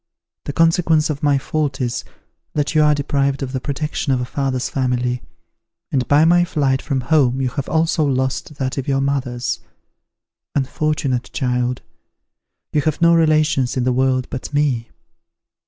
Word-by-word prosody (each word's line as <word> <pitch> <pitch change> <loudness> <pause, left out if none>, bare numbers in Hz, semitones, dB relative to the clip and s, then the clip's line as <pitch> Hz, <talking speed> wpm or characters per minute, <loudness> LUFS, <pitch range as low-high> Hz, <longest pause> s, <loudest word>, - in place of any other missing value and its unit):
The 145 - -4
consequence 165 -1 +3
of 145 0 -5
my 145 -2 +3
fault 145 -1 -2
is, 125 -1 -2 0.5
that 145 -1 0
you 155 - +4
are 150 -1 +4
deprived 140 -1 0
of 130 - -4
the 130 -1 -3
protection 145 0 -2
of 130 - +2
a 125 - -2
father's 130 -1 -2
family, 125 -2 -1 0.7
and 130 -2 0
by 145 +2 +5
my 175 +1 +5
flight 140 -6 0
from 135 -3 -1
home 130 -2 +2
you 130 -1 0
have 135 +2 -4
also 160 0 +2
lost 130 +1 -1
that 135 0 -2
of 130 - -5
your 135 -1 +1
mother's. 130 -4 -1 1.0
Unfortunate 140 -2 -1
child! 125 -1 -1 0.9
you 150 - +3
have 155 0 -1
no 170 0 +5
relations 155 -5 +2
in 125 - +1
the 125 0 +1
world 130 0 +1
but 130 - -5
me!" 140 -6 0
140 Hz, 160 wpm, -20 LUFS, 130-150 Hz, 1.0 s, by